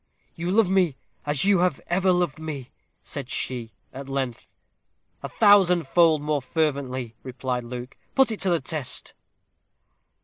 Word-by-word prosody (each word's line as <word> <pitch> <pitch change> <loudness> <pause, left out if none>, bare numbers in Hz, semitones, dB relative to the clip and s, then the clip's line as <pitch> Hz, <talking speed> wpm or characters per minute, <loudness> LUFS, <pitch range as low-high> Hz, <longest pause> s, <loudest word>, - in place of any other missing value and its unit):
"You 170 +1 -4
love 210 +1 +4
me 180 -7 +2 0.3
as 145 +3 +1
you 200 -2 +4
have 175 -5 +1
ever 185 +2 +2
loved 175 -4 0
me?" 145 -5 -6 0.3
said 135 -3 -7
she, 120 -4 -3 0.2
at 135 +1 -8
length. 135 -3 -3 0.7
"A - - -5
thousand 190 -5 +5
fold 160 -2 +4
more 150 -1 0
fervently," 130 -5 -2
replied 125 -1 -3
Luke; 125 +1 -7 0.2
"put 265 -3 +4
it 220 - -4
to 195 - 0
the 170 -2 +2
test." 130 -2 -3
150 Hz, 145 wpm, -25 LUFS, 130-180 Hz, 0.7 s, thousand